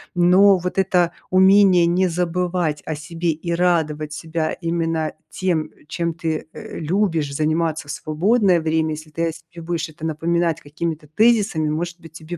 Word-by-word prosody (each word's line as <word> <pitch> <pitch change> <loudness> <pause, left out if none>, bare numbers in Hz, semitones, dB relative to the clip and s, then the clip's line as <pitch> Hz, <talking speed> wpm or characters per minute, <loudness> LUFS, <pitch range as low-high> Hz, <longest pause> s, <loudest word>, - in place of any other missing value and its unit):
Но 185 +3 +6
вот 180 +2 -3
это 180 -2 +2 0.2
умение 190 -1 +5
не 180 +2 +2
забывать 175 -2 -1
о 155 - -2
себе 165 +3 -4
и 165 +2 -4
радовать 160 -4 0
себя 160 0 -3
именно 165 -2 -1 0.2
тем, 165 -5 -1 0.2
чем 170 -1 -2
ты, 160 -2 -3
э, - - -8
любишь 165 -4 0
заниматься 155 0 0
в - - -4
свободное 185 +5 +2
время, 160 0 0
если 155 0 -11
ты 165 +2 -1
о - - -1
себе 165 +1 -13
будешь 170 -2 -2
это 155 +1 -15
напоминать 165 +1 0
какими-то 155 +1 -5
тезисами, 200 -3 +2
может 170 +3 -3
быть, 165 -1 -13
тебе 165 +1 -8
165 Hz, 160 wpm, -21 LUFS, 155-180 Hz, 0.2 s, Но